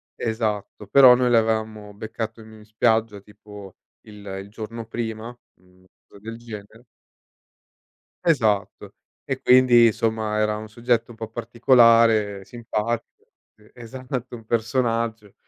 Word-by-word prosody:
esatto, 110 Hz, -2 st, -4 dB
però 130 Hz, +3 st, +7 dB
noi 125 Hz, 0 st, +1 dB
l'avevamo 110 Hz, -2 st, 0 dB
beccato 110 Hz, +2 st, -6 dB
in 110 Hz, -1 st, -15 dB
spiaggia 110 Hz, -1 st, 0 dB
tipo 105 Hz, -1 st, -14 dB, 0.3 s
il 105 Hz, -1 st, -13 dB, 0.2 s
il 100 Hz, -, -15 dB
giorno 115 Hz, +2 st, -8 dB
prima, 115 Hz, -1 st, -5 dB, 0.3 s
mhmm, 90 Hz, 0 st, -26 dB, 0.2 s
cosa 100 Hz, -, -17 dB
del 115 Hz, +2 st, -8 dB
genere 110 Hz, 0 st, -11 dB, 1.4 s
Esatto. 110 Hz, -, 0 dB, 0.3 s
E 135 Hz, -1 st, -4 dB
quindi, 125 Hz, -2 st, +6 dB
insomma, 110 Hz, -1 st, -1 dB
era 105 Hz, 0 st, +1 dB
un 110 Hz, 0 st, -8 dB
soggetto 120 Hz, +1 st, -1 dB
un 115 Hz, -, -12 dB
po' 110 Hz, 0 st, -7 dB
particolare, 115 Hz, -3 st, +3 dB
simpatico 115 Hz, 0 st, -4 dB, 0.5 s
sì, 105 Hz, 0 st, -22 dB
esatto, 125 Hz, +1 st, -7 dB
un 115 Hz, -, -14 dB
personaggio. 115 Hz, -2 st, -2 dB
110 Hz, 120 wpm, -23 LUFS, 105-120 Hz, 1.4 s, però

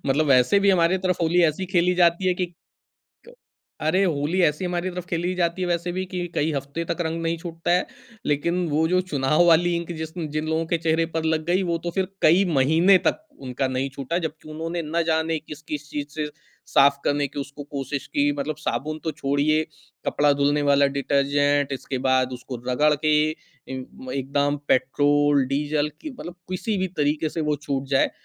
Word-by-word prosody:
मतलब 145 Hz, +3 st, +2 dB
वैसे 130 Hz, +8 st, +5 dB
भी 200 Hz, 0 st, +4 dB
हमारी 180 Hz, 0 st, +3 dB
तरफ 185 Hz, -1 st, -1 dB
होली 170 Hz, +2 st, +3 dB
ऐसी 165 Hz, +4 st, 0 dB
खेली 180 Hz, -1 st, +2 dB
जाती 175 Hz, +1 st, +3 dB
है -, -, +3 dB
कि, 180 Hz, 0 st, -1 dB, 0.8 s
क -, -, -14 dB, 0.5 s
अरे! 160 Hz, +5 st, +2 dB
होली 160 Hz, +2 st, 0 dB
ऐसी 150 Hz, +3 st, +1 dB
हमारी 180 Hz, +1 st, -2 dB
तरफ 180 Hz, 0 st, -6 dB
खेली 175 Hz, +2 st, -1 dB
जाती 175 Hz, +1 st, 0 dB
है 180 Hz, -, -1 dB
वैसे 175 Hz, 0 st, -1 dB
भी 185 Hz, +1 st, -2 dB
कि 180 Hz, -1 st, -4 dB
कई 155 Hz, +2 st, +1 dB
हफ्ते 140 Hz, +4 st, -4 dB
तक 170 Hz, -, 0 dB
रंग 165 Hz, 0 st, -2 dB
नहीं 165 Hz, 0 st, 0 dB
छूटता 165 Hz, 0 st, -4 dB
है। 180 Hz, +1 st, +3 dB, 0.4 s
लेकिन 170 Hz, +5 st, 0 dB
वो 155 Hz, +2 st, +2 dB
जो 185 Hz, +1 st, +3 dB
चुनाव 150 Hz, -2 st, +2 dB
वाली 170 Hz, +1 st, +4 dB
इंक 170 Hz, 0 st, -5 dB
जिस 160 Hz, 0 st, -5 dB, 0.2 s
जिन 155 Hz, +1 st, -2 dB
लोगों 160 Hz, +1 st, 0 dB
के 170 Hz, 0 st, 0 dB
चेहरे 165 Hz, 0 st, +1 dB
पर 160 Hz, -1 st, -3 dB
लग 160 Hz, -1 st, 0 dB
गई, 180 Hz, +2 st, +2 dB
वो 170 Hz, -2 st, -1 dB
तो 175 Hz, +1 st, -4 dB
फिर 190 Hz, +1 st, -1 dB
कई 175 Hz, +5 st, +5 dB
महीने 165 Hz, +8 st, +5 dB
तक -, -, +2 dB, 0.2 s
उनका 130 Hz, 0 st, -2 dB
नहीं 130 Hz, +1 st, -1 dB
छूटा, 140 Hz, +6 st, -3 dB
जबकि 155 Hz, -2 st, -6 dB
उन्होंने 165 Hz, +2 st, -4 dB
ना 165 Hz, +2 st, -1 dB
जाने 160 Hz, 0 st, +1 dB
किस-किस 150 Hz, -1 st, -8 dB
चीज़ 145 Hz, -1 st, -4 dB
से 150 Hz, -1 st, -2 dB, 0.5 s
साफ 140 Hz, 0 st, +5 dB
करने 145 Hz, 0 st, +1 dB
की 140 Hz, +1 st, -6 dB
उसको 140 Hz, +1 st, -7 dB
कोशिश 140 Hz, -1 st, -5 dB
की 145 Hz, 0 st, +1 dB
मतलब 150 Hz, +2 st, -2 dB
साबुन 155 Hz, 0 st, -3 dB
तो 160 Hz, -, 0 dB
छोड़िए, 145 Hz, +2 st, +1 dB, 0.4 s
कपड़ा 145 Hz, 0 st, +3 dB
धुलने 145 Hz, +1 st, +1 dB
वाला 140 Hz, 0 st, +5 dB
डिटर्जेंट 140 Hz, 0 st, +1 dB
इसके 130 Hz, 0 st, -4 dB
बाद 130 Hz, -1 st, +2 dB
उसको 125 Hz, 0 st, -6 dB
रगड़ 150 Hz, +4 st, +3 dB
के 150 Hz, +1 st, -2 dB, 0.2 s
ए 155 Hz, -, -5 dB, 0.8 s
एकदाम 140 Hz, +2 st, 0 dB
पेट्रोल, 145 Hz, +2 st, +3 dB
डीजल 145 Hz, +2 st, 0 dB
कि 310 Hz, -1 st, -6 dB
मतलब 175 Hz, -, -7 dB, 0.2 s
किसी 200 Hz, +3 st, -2 dB
भी 190 Hz, -, 0 dB
तरीके 150 Hz, +1 st, +1 dB
से 160 Hz, -, -4 dB
वो 150 Hz, -1 st, 0 dB
छूट 140 Hz, -2 st, -3 dB
जाए, 135 Hz, -1 st, +2 dB
155 Hz, 195 wpm, -24 LUFS, 145-175 Hz, 0.8 s, वैसे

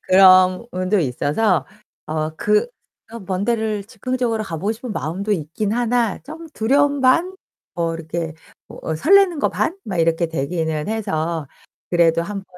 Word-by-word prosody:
그런 185 Hz, -1 st, +7 dB
부분도 185 Hz, +3 st, 0 dB
있어서 155 Hz, -, +1 dB, 0.4 s
어 155 Hz, 0 st, -2 dB
그 210 Hz, -, +2 dB, 0.5 s
어 230 Hz, -, -6 dB
먼 190 Hz, 0 st, -3 dB
데를 220 Hz, -3 st, -1 dB
즉흥적으로 230 Hz, +1 st, -2 dB
가 165 Hz, -, -5 dB
보고 200 Hz, +8 st, -1 dB
싶은 235 Hz, +1 st, -7 dB
마음도 195 Hz, +5 st, -3 dB
있기는 200 Hz, +6 st, -2 dB
하나 240 Hz, -3 st, +1 dB
좀 320 Hz, +3 st, -10 dB
두려움 280 Hz, +5 st, +2 dB
반 335 Hz, +9 st, +3 dB, 0.4 s
뭐 165 Hz, -1 st, -1 dB
이렇게 165 Hz, 0 st, -4 dB, 0.3 s
뭐 -, -, -11 dB
어 160 Hz, -, -1 dB
설레는 365 Hz, -, +4 dB
거 -, -, +2 dB
반 340 Hz, +4 st, -1 dB
막 190 Hz, -5 st, -4 dB
이렇게 165 Hz, +1 st, +2 dB
되기는 160 Hz, 0 st, -2 dB
해서 165 Hz, -8 st, -2 dB, 0.4 s
그래도 170 Hz, -1 st, +3 dB
한번 200 Hz, +1 st, -6 dB
195 Hz, 295 characters per minute, -20 LUFS, 165-230 Hz, 0.5 s, 그런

